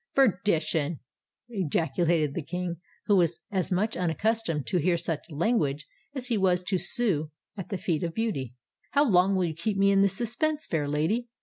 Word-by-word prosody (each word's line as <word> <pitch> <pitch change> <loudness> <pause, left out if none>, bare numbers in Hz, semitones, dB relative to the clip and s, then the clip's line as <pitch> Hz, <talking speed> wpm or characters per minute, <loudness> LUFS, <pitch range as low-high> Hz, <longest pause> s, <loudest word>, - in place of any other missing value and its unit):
"Perdition!" 170 - +2 0.5
ejaculated 165 - 0
the 170 - -3
King, 180 +2 -4 0.3
who 205 - +4
was 170 -2 +1
as 190 -3 -1
much 210 +5 +1
unaccustomed 180 - -1
to 180 - 0
hear 170 +2 +2
such 165 -1 -3
language 150 - 0 0.3
as 260 -2 -3
he 235 -4 0
was 180 -1 +2
to 185 0 0
sue 175 -12 +1 0.3
at 190 -3 -7
the 195 - -2
feet 170 -3 -1
of 170 -2 -3
beauty: 140 - -2 0.4
"how 285 +1 +4
long 190 -1 +4
will 185 -1 +2
you 165 - -2
keep 195 +6 -2
me 195 0 +4
in 195 0 +4
this 195 -1 +2
suspense, 290 +7 -1
fair 150 -3 -1
lady? 160 +12 0
180 Hz, 180 wpm, -27 LUFS, 160-210 Hz, 0.5 s, who